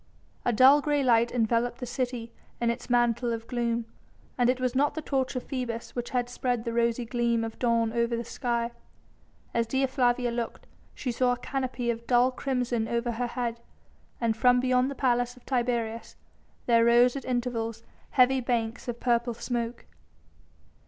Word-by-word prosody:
A - - +2
dull 265 +5 +7
grey 290 -1 +1
light 235 -2 +4
enveloped 235 0 +1
the 250 - -4
city 245 -1 -3 0.3
in 235 -1 +2
its 235 - -7
mantle 240 0 +2
of 230 0 -4
gloom, 235 -1 -1 0.5
and 245 -1 +2
it 255 0 +1
was 255 -1 0
not 285 +3 +2
the 315 - -3
torch 265 -2 -1
of 250 - -2
Phoebus 245 -4 -5
which 240 -1 -3
had 245 -1 0
spread 245 -1 -2
the 230 -1 -3
rosy 235 +1 +1
gleam 235 -1 0
of 225 0 -6
dawn 230 -2 +1
over 235 0 +1
the 235 - -3
sky! 235 0 -2 0.8
As 230 -1 +1
Dea 265 +3 +1
Flavia 245 -2 +1
looked, 235 -1 -4 0.3
she 255 - -3
saw 245 +1 +2
a - - -4
canopy 250 -2 -2
of 235 0 -7
dull 250 +1 +4
crimson 250 -4 -1
over 235 +1 -1
her 240 +1 -2
head, 235 -1 -3 0.6
and 230 -2 +1
from 250 +2 +4
beyond 255 +1 +2
the 280 - -5
Palace 245 -1 +1
of 250 - -19
Tiberius 235 -3 -2 0.5
there 230 -1 +4
rose 240 +2 +5
at 275 - -4
intervals 235 -2 -2 0.3
heavy 260 0 +4
banks 235 -1 -2
of 240 -1 -4
purple 235 -1 +1
smoke. 235 0 -3
240 Hz, 175 wpm, -28 LUFS, 235-250 Hz, 0.8 s, dull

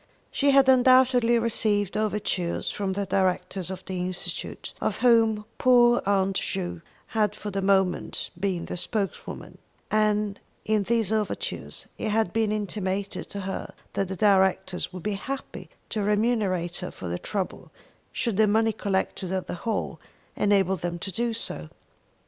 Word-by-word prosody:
She 280 - +2
had 275 -1 +6
undoubtedly 255 -2 +5
received 215 -3 +1
overtures 210 -5 -1
from 195 -2 -2
the 200 +1 -2
directors 185 -1 0
of 185 0 -7
the 185 -1 -4
Institute 180 0 -5
of - - 0
whom 225 -3 +4
poor 240 -1 +5
Aunt 195 -1 +2
Ju 175 -3 -3 0.3
had 210 -2 +1
for 210 - -6
the 195 0 -1
moment 190 -2 +1
been 185 -3 -1
the - - -5
spokeswoman, 200 +2 -3 0.3
and 210 -1 +1 0.3
in 215 -1 +2
these 225 0 +1
overtures 215 -2 -2
it 220 - -1
had 215 -4 +1
been 225 -2 +1
intimated 200 -1 -2
to 200 - -5
her 190 0 -5 0.2
that 195 - 0
the 190 - -4
directors 190 -3 +2
would 185 -2 -8
be 210 - -1
happy 265 +7 -6 0.2
to 215 - -1
remunerate 205 -5 +1
her 180 - -4
for 90 - -8
her 90 - -2
trouble 195 -3 -4 0.4
should 230 -6 -1
the 215 0 +5
money 220 +1 +3
collected 190 -2 -2
at 190 -1 -1
the - - -5
hall 215 +6 -3 0.4
enable 195 -2 +3
them 175 0 -3
to 190 +3 -5
do 235 +5 -1
so. 80 - -4
205 Hz, 155 wpm, -26 LUFS, 190-220 Hz, 0.4 s, had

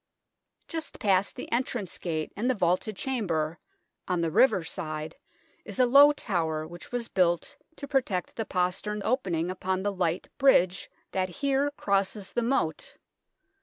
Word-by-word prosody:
Just 325 -2 -5
past 195 -1 +2
the - - -8
entrance 235 -6 -2
gate 160 -3 -3
and 235 +5 0
the 260 - +2
vaulted 185 +2 0
chamber, 175 -10 -1 0.5
on 180 -1 0
the 165 -1 0
river 210 -3 +4
side, 155 -1 -4 0.5
is - - -8
a 255 - +5
low 280 +4 +8
tower 165 - -2
which 175 +1 -11
was 245 -1 -2
built 175 - +1 0.2
to 280 - -7
protect 250 -10 -1
the 225 - -2
postern 195 +3 -1
opening 185 - 0
upon 185 0 -2
the 205 0 0
light 180 -2 -1
bridge 185 -9 +4 0.2
that 185 -1 0
here 275 +7 0
crosses 200 0 0
the 240 - +1
moat. 275 - -1
195 Hz, 150 wpm, -28 LUFS, 175-245 Hz, 0.5 s, low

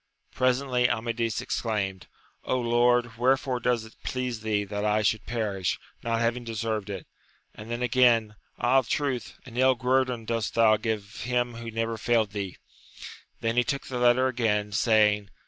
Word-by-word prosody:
Presently 130 -1 +2
Amadis 115 0 -1
ex - - -2
claimed, 100 -5 -2 0.4
Lord, 120 -1 +2
wherefore 130 0 +2
does 120 -2 0
it 110 - -14
please 125 -4 -3
thee 105 -2 0
that 105 +1 -4
I 105 0 +2
should 110 +1 0
perish, 105 -6 -1 0.2
not 115 0 -1
having 120 +1 0
deserved 110 -2 -3
it! 95 -4 -5 0.5
and 110 +2 -11
then 120 +1 -2
again. 115 -3 +3 0.2
Ah, 130 +4 +4
truth, 130 0 -2
an 125 -2 -10
ill 130 0 +4
guerdon 125 -2 0
dost 115 -1 -2
thou 115 -2 +5
give 105 -2 -4
him 120 -1 0
who 115 0 -7
never 115 0 -2
failed 110 -3 +1
thee! 100 -3 -5 0.8
Then 115 +1 -1
he 125 - +5
took 140 0 -3
the 125 -2 -4
letter 120 +1 +4
again, 110 -5 0
saying. 105 -1 +3
115 Hz, 160 wpm, -27 LUFS, 110-125 Hz, 0.8 s, thou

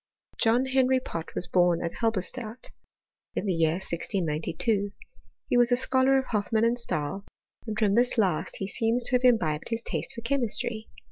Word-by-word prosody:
John 235 +3 +3
Henry 260 0 +3
Pott 165 -9 -7
was - - -1
bom 175 -2 +3
at 170 - -4
Halberstadt, 225 +2 -2 0.6
in - - -2
the 190 - +1
year 160 -1 +2
1692. 185 +3 -1 0.5
He - - +2
was 240 0 +4
a - - +6
scholar 260 +1 +3
of 265 - 0
Hoffmann 220 0 0
and 240 +1 +1
Stahl, 195 -2 -2 0.4
and 215 -1 -3
from 210 -3 +2
this 240 +3 +3
last 185 -8 +1
he 195 - -4
seems 230 +4 +1
to 235 - 0
have 250 0 +2
imbibed 170 -12 +2
his 230 0 -2
taste - - -3
for 230 - -6
chemistry. 230 -3 -1
225 Hz, 175 wpm, -27 LUFS, 185-245 Hz, 0.6 s, a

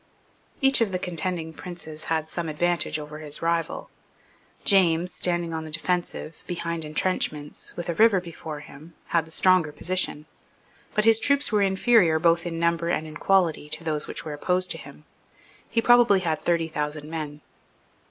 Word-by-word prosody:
Each 270 -2 +4
of 220 -4 +2
the 185 - 0
contending 175 -2 -3
princes 160 -3 -9
had 160 -1 -1
some 165 0 -4
advantages 170 0 0
over 150 0 -8
his 150 0 -4
rival. 165 0 -1 0.7
James, 180 -3 +3
standing 175 -2 -1
on 160 0 -3
the 160 - -8
defensive, 165 0 -3
behind 170 -2 -3
entrenchments, 150 -2 -2
with 175 - -4
a 170 - 0
river 215 +1 +5
before 160 -3 -8
him, 155 +3 -14
had 165 -2 +2
the 160 - -16
stronger 180 -2 +3
position; 155 -1 -1 0.7
but 210 -1 +2
his 225 -1 +6
troops 280 +4 +2
were 210 -1 +3
inferior 195 -3 +4
both 170 +1 +2
in 165 -1 -4
number 170 0 +1
and 160 - 0
in 155 -1 -8
quality 175 -6 +2
to 155 +2 0
those 155 -2 0
which - - -6
were 155 - -4
opposed 180 +4 0
to 165 - -2
him. 140 +1 -13 0.6
He 230 - +1
probably 240 -5 +6
had 160 -4 -1
thirty 170 -1 +1
thousand 150 -1 -3
men. 150 -2 -5
170 Hz, 170 wpm, -25 LUFS, 155-185 Hz, 0.7 s, his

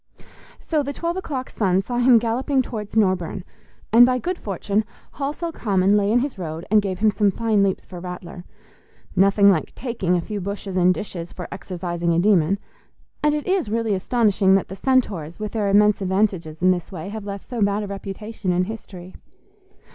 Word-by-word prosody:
So 310 -3 -1
the 285 0 -4
twelve 340 +3 -2
o'clock 280 -9 -4
sun 190 -2 +1
saw 245 +3 -2
him 245 -1 +6
galloping 255 +4 +1
towards 215 -3 -6
Norburne; 185 -3 +1 0.5
and 235 +2 +9
by 250 +1 +4
good 350 +8 -3
fortune 200 +2 -1 0.4
Halsell 300 +4 -3
Common 200 - +2
lay 205 0 +2
in 240 +2 +4
his 265 -6 -4
road 165 -1 -5
and 215 -1 +6
gave 190 -2 -3
him 215 +2 +3
some 205 0 +2
fine 215 +1 +1
leaps 195 -1 0
for 180 - -9
Rattler. 180 0 -8 0.7
Nothing 200 +1 +5
like 165 -5 -2
"taking" 230 -8 -1
a 175 - +1
few 205 +3 -5
bushes 200 0 -5
and 180 0 +4
ditches 180 -4 -5
for 180 - -7
exorcising 175 -3 -3
a - - +3
demon; 190 -1 +3 0.6
and 300 0 +2
it 300 - -3
is 370 - 0
really 225 -1 0
astonishing 200 -1 +2
that 195 - 0
the 190 - -6
Centaurs, 195 - 0
with 215 -1 -4
their 210 -3 0
immense 210 +1 +4
advantages 185 -4 -1
in 185 - +6
this 175 0 -3
way, 180 0 -6
have 210 -1 -7
left 200 -1 -6
so 240 -3 -4
bad 200 +1 +1
a - - -5
reputation 200 0 -5
in 180 +1 +2
history. 185 -3 -8
200 Hz, 190 wpm, -22 LUFS, 185-230 Hz, 0.7 s, and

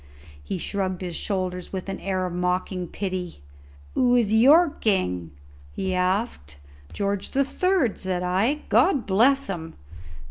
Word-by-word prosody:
He 70 - -4
shrugged 190 0 -3
his 175 -2 -4
shoulders 185 -3 -3
with 190 -1 -5
an 195 - -4
air 185 -1 -1
of 180 - -4
mocking 180 0 -1
pity. 185 - -4 0.5
"Who 245 -1 +3
is 225 -4 +2
your 290 +9 +6
king?" 90 - -1 0.4
he 190 - -2
asked. 180 - -1 0.3
"George 200 -1 -2
the 275 +1 +1
Third," 365 - +1
said 185 -2 -2
I; 205 +12 +1
"God 260 - +3
bless 255 +8 +3
him!" 165 -4 -6
190 Hz, 140 wpm, -24 LUFS, 180-235 Hz, 0.5 s, your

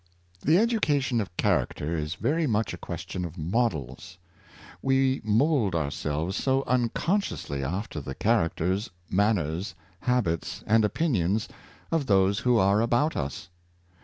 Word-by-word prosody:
'" 90 - -37
The 155 +4 +4
education 145 - +2
of 90 -4 -7
character 80 -3 0
is 75 +1 -3
very 150 - 0
much 110 -2 0
a - - -6
question 90 +1 -5
of 85 0 -6
models; 85 - -2 0.6
we 135 0 +2
mould 110 - +2
ourselves 75 +3 -2
so 135 0 +1
unconsciously 125 - -1
after 85 +2 -3
the 65 0 -6
characters, 100 -1 +1 0.2
manners, 95 -2 0 0.2
habits 110 -11 -1
and 110 +1 +4
opinions 105 - +1 0.4
of 160 -5 0
those 100 0 +3
who 125 -1 +3
are 100 +1 +4
about 120 +7 +1
us. 70 +4 -4
105 Hz, 130 wpm, -27 LUFS, 85-125 Hz, 0.6 s, The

